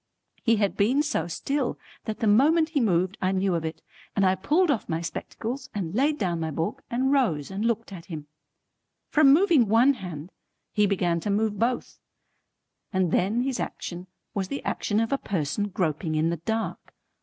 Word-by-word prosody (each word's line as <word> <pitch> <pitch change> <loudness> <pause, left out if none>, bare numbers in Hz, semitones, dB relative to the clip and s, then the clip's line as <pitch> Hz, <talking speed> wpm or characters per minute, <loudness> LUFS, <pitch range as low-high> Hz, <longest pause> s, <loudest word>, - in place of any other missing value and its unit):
He 230 -1 +3
had 205 -2 +1
been 255 +9 +3
so 300 - -1
still, 270 - -2 0.3
that 220 -2 -4
the - - +2
moment 305 +10 +4
he 310 -3 0
moved 185 -3 +1
I 185 0 +2
knew 190 0 +1
of 165 -2 -1
it, 160 0 -5 0.3
and 195 - +3
I 185 - +4
pulled 300 - +2
off 235 - -2
my 160 0 0
spectacles 240 +9 -5
and 180 -5 -3
laid 290 +6 +2
down 175 - -1
my 160 -1 -2
book 165 - -3
and 260 +3 +1
rose 190 - +1
and 195 +2 -3
looked 230 -2 -1
at 170 -2 -9
him. 155 -4 -6 0.9
From 295 -3 +6
moving 310 - +5
one 235 +6 +5
hand 180 - -7 0.4
he 210 -1 +3
began 175 -4 +1
to 205 - -4
move 210 0 0
both, 240 +2 -1 0.9
and 185 -4 +1
then 205 +6 +2
his 260 0 -1
action 180 +1 -5 0.3
was 195 -3 -1
the 280 - -5
action 205 0 0
of 225 0 0
a 275 - +1
person 185 +2 -1
groping 160 -4 -1
in 160 +2 +2
the 170 - -2
dark. 220 +7 -4
205 Hz, 190 wpm, -26 LUFS, 175-255 Hz, 0.9 s, From